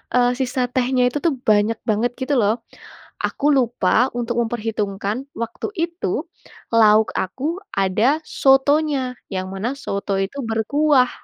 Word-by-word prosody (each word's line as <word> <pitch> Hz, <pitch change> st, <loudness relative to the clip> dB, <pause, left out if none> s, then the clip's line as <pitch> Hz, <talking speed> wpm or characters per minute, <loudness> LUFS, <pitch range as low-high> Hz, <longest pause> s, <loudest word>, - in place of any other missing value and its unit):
eee, 245 Hz, 0 st, +4 dB
sisa 255 Hz, -1 st, 0 dB
tehnya 255 Hz, 0 st, +1 dB
itu -, -, -2 dB
tuh 330 Hz, -, +3 dB, 0.2 s
banyak 210 Hz, +2 st, +3 dB
banget 225 Hz, +3 st, +1 dB
gitu 285 Hz, +2 st, -1 dB
loh. 220 Hz, +3 st, 0 dB, 0.6 s
Aku 290 Hz, +1 st, +1 dB
lupa 245 Hz, -2 st, +2 dB
untuk 240 Hz, 0 st, -2 dB
memperhitungkan 220 Hz, 0 st, -3 dB
waktu 230 Hz, -1 st, -4 dB
itu, 335 Hz, +2 st, -2 dB, 0.5 s
lauk 220 Hz, -1 st, +5 dB
aku 290 Hz, -, -3 dB, 0.2 s
ada 210 Hz, +10 st, +2 dB
sotonya, 270 Hz, -1 st, +2 dB, 0.2 s
yang 185 Hz, 0 st, -2 dB
mana 220 Hz, +7 st, -2 dB
soto 200 Hz, -6 st, -3 dB
itu 195 Hz, +8 st, -3 dB
berkuah, 255 Hz, +4 st, +2 dB
245 Hz, 130 wpm, -21 LUFS, 215-270 Hz, 0.6 s, lauk